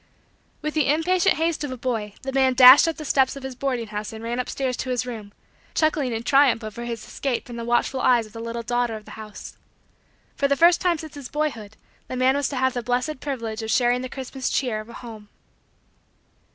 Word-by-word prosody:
With 305 Hz, 0 st, -2 dB
the 300 Hz, -2 st, +2 dB
impatient 350 Hz, +4 st, +2 dB
haste 325 Hz, -1 st, -1 dB
of 290 Hz, -, -3 dB
a 255 Hz, -, -5 dB
boy, 225 Hz, -5 st, -3 dB
the 270 Hz, -, -3 dB
man 265 Hz, -1 st, +3 dB
dashed 255 Hz, +5 st, +9 dB
up 325 Hz, -, -1 dB
the 305 Hz, -, -7 dB
steps 265 Hz, -1 st, +2 dB
of 275 Hz, -, -9 dB
his 265 Hz, -1 st, -5 dB
boarding 250 Hz, -2 st, -2 dB
house 210 Hz, 0 st, -5 dB
and 220 Hz, 0 st, -9 dB
ran 235 Hz, +2 st, -3 dB
up 250 Hz, -, -3 dB
stairs 260 Hz, -2 st, -2 dB
to 255 Hz, -, -4 dB
his 250 Hz, 0 st, -1 dB
room; 220 Hz, -5 st, -7 dB, 0.4 s
chuckling 305 Hz, -5 st, +1 dB
in 225 Hz, 0 st, -3 dB
triumph 270 Hz, -3 st, +4 dB
over 215 Hz, +2 st, -6 dB
his 230 Hz, -2 st, -5 dB
escape 265 Hz, -4 st, -3 dB
from 240 Hz, -, -9 dB
the 235 Hz, -, -5 dB
watchful 240 Hz, +3 st, 0 dB
eyes 240 Hz, -3 st, +4 dB
of 215 Hz, -, -16 dB
the 225 Hz, -, -8 dB
little 230 Hz, 0 st, -5 dB
daughter 240 Hz, -1 st, -1 dB
of 215 Hz, -1 st, -10 dB
the -, -, -12 dB
house. 215 Hz, -1 st, -10 dB, 0.8 s
For 280 Hz, -, +1 dB
the 280 Hz, 0 st, +1 dB
first 340 Hz, +2 st, +5 dB
time 355 Hz, -2 st, +2 dB
since 310 Hz, -1 st, -9 dB
his 280 Hz, -4 st, -9 dB
boyhood 235 Hz, -9 st, -3 dB, 0.3 s
the -, -, -5 dB
man 260 Hz, +1 st, +3 dB
was 285 Hz, -1 st, 0 dB
to 280 Hz, -, -5 dB
have 260 Hz, 0 st, +1 dB
the 245 Hz, -, -2 dB
blessed 250 Hz, +5 st, -1 dB
privilege 230 Hz, -6 st, -4 dB
of 220 Hz, -, -5 dB
sharing 245 Hz, +2 st, +2 dB
the 255 Hz, -, -5 dB
Christmas 265 Hz, 0 st, -4 dB
cheer 245 Hz, -5 st, -1 dB
of 215 Hz, -, -14 dB
a -, -, -10 dB
home. 220 Hz, -4 st, -10 dB
250 Hz, 230 wpm, -24 LUFS, 230-275 Hz, 0.8 s, dashed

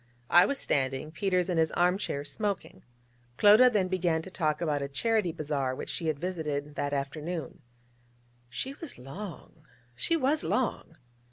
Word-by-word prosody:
I 175 Hz, -, +7 dB
was 280 Hz, -, -1 dB
standing; 135 Hz, -, -1 dB
Peters 180 Hz, +1 st, 0 dB
in 175 Hz, -3 st, 0 dB
his 160 Hz, -1 st, +2 dB
arm 180 Hz, +2 st, +2 dB
chair, 140 Hz, -7 st, -3 dB
smoking. 200 Hz, +7 st, -3 dB, 0.6 s
Clodagh 215 Hz, +5 st, +7 dB
then 200 Hz, -5 st, +2 dB
began 175 Hz, -3 st, 0 dB
to 190 Hz, -, -10 dB
talk 155 Hz, -5 st, 0 dB
about 150 Hz, -4 st, 0 dB
a 140 Hz, -, -2 dB
Charity 210 Hz, +5 st, +1 dB
Bazaar 145 Hz, -5 st, -2 dB
which -, -, -6 dB
she 165 Hz, -, -3 dB
had 155 Hz, -2 st, 0 dB
visited 150 Hz, -4 st, -3 dB
that 145 Hz, -1 st, -2 dB
afternoon. 150 Hz, +4 st, -4 dB, 0.9 s
She 260 Hz, -, -4 dB
was 300 Hz, 0 st, -7 dB
long, 155 Hz, +2 st, -9 dB, 0.3 s
she 335 Hz, -, +1 dB
was 295 Hz, +1 st, +2 dB
long. 245 Hz, -9 st, -1 dB
165 Hz, 160 wpm, -29 LUFS, 145-200 Hz, 0.9 s, I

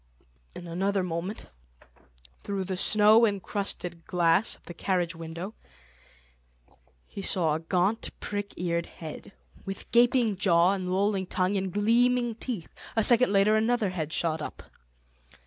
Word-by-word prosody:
In 175 Hz, -, -8 dB
another 190 Hz, +3 st, -1 dB
moment, 180 Hz, +4 st, -4 dB, 1.0 s
through 200 Hz, -1 st, -3 dB
the 185 Hz, 0 st, -4 dB
snow 215 Hz, +4 st, +5 dB
encrusted 195 Hz, -4 st, -2 dB
glass 180 Hz, 0 st, +2 dB
of -, -, -25 dB
the 175 Hz, -, -9 dB
carriage 175 Hz, -1 st, -1 dB
window, 165 Hz, +5 st, -7 dB, 1.5 s
he 200 Hz, -, -8 dB
saw 170 Hz, -5 st, +2 dB
a 155 Hz, -, -1 dB
gaunt 185 Hz, +6 st, 0 dB
prick 205 Hz, -1 st, -5 dB
eared 170 Hz, -1 st, -2 dB
head, 155 Hz, -2 st, -10 dB, 0.3 s
with 195 Hz, 0 st, -7 dB
gaping 240 Hz, -3 st, +3 dB
jaw 175 Hz, -2 st, +4 dB
and 185 Hz, -2 st, -3 dB
lolling 195 Hz, 0 st, 0 dB
tongue 185 Hz, +2 st, 0 dB
and 190 Hz, -1 st, -2 dB
gleaming 240 Hz, +4 st, +2 dB
teeth; 220 Hz, -6 st, -5 dB, 0.2 s
a 225 Hz, -, +2 dB
second 240 Hz, 0 st, +6 dB
later 200 Hz, +2 st, +4 dB
another 220 Hz, -2 st, +1 dB
head 160 Hz, -4 st, -4 dB
shot 160 Hz, -1 st, 0 dB
up. -, -, -7 dB
195 Hz, 135 wpm, -27 LUFS, 175-215 Hz, 1.5 s, second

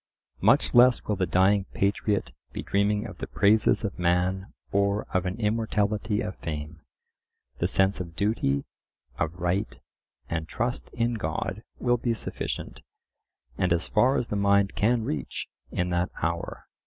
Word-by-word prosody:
Much 120 Hz, +9 st, +4 dB
less 125 Hz, 0 st, +6 dB
will 105 Hz, -, -1 dB
the 90 Hz, -1 st, 0 dB
dying 95 Hz, +3 st, +3 dB
patriot 100 Hz, -, 0 dB, 0.2 s
be -, -, -4 dB
dreaming 105 Hz, +2 st, +1 dB
of -, -, -9 dB
the -, -, -4 dB
praises 105 Hz, +2 st, +3 dB
of 100 Hz, -4 st, -4 dB
man 90 Hz, +2 st, +1 dB, 0.2 s
or 100 Hz, +1 st, +2 dB
of 95 Hz, 0 st, +1 dB
an 95 Hz, +5 st, -4 dB
immortality 105 Hz, -1 st, 0 dB
of 105 Hz, -3 st, -4 dB
fame: 80 Hz, 0 st, -5 dB, 0.8 s
the -, -, +2 dB
sense 95 Hz, 0 st, +2 dB
of 85 Hz, -2 st, -6 dB
duty, 75 Hz, -8 st, 0 dB, 0.5 s
of 80 Hz, -, 0 dB
right, 90 Hz, +4 st, -1 dB, 0.5 s
and 80 Hz, -1 st, -3 dB
trust 120 Hz, +7 st, -2 dB
in 120 Hz, +1 st, 0 dB
God 95 Hz, 0 st, -3 dB, 0.2 s
will 120 Hz, -1 st, +2 dB
be 115 Hz, 0 st, 0 dB
sufficient, -, -, -5 dB, 0.8 s
and 90 Hz, -1 st, +1 dB
as 85 Hz, +1 st, +1 dB
far 130 Hz, +3 st, +3 dB
as 120 Hz, -, -2 dB
the -, -, -2 dB
mind 100 Hz, -1 st, +3 dB
can 115 Hz, +2 st, +2 dB
reach, 75 Hz, -, -4 dB, 0.2 s
in 90 Hz, 0 st, -1 dB
that 90 Hz, +1 st, +1 dB
hour. 85 Hz, +1 st, -2 dB
100 Hz, 155 wpm, -27 LUFS, 90-110 Hz, 0.8 s, less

